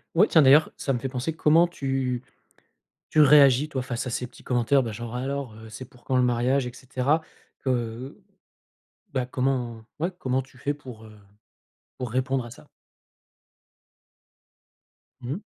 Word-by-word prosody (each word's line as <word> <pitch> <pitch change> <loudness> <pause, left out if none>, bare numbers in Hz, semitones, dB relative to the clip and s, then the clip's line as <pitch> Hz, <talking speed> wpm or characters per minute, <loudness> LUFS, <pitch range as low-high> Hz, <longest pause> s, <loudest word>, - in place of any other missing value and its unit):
Oui, 205 +6 +6
tiens 160 - +6
d'ailleurs, 145 +3 +6
ça 135 - -1
me 120 - -1
fait 135 - -4
penser: 130 +5 -3
comment 165 +2 +4
tu 135 -6 -2 0.9
tu 155 - +3
réagis 140 -1 +6
toi, 130 -3 -3
face 125 0 -4
à - - -2
ces 125 +1 -3
petits - - -18
commentaires? 125 +2 +2
Bah 115 - -4
genre; 120 +2 -6
«Alors, 135 -2 -3
heu, 110 0 -11
c'est 110 +4 -8
pour 125 0 -21
quand 130 - 0
le 125 - +4
mariage 125 +2 +1
et - - -9
cetera». 135 +4 0 0.4
Que 125 0 -3 1.0
bah, 130 -1 +1
comment 125 -3 -2
ouais, 175 +4 0
comment 130 0 0
tu 130 -1 -19
fais 145 +2 -1
pour, 125 -6 -11
heu, 110 - -15 0.8
pour 125 -2 -5
répondre 130 +1 0
à 120 - -9
ça? - - -15 2.5
Mmh 125 +2 -5
mh. 185 - -5
130 Hz, 165 wpm, -25 LUFS, 120-140 Hz, 2.5 s, Oui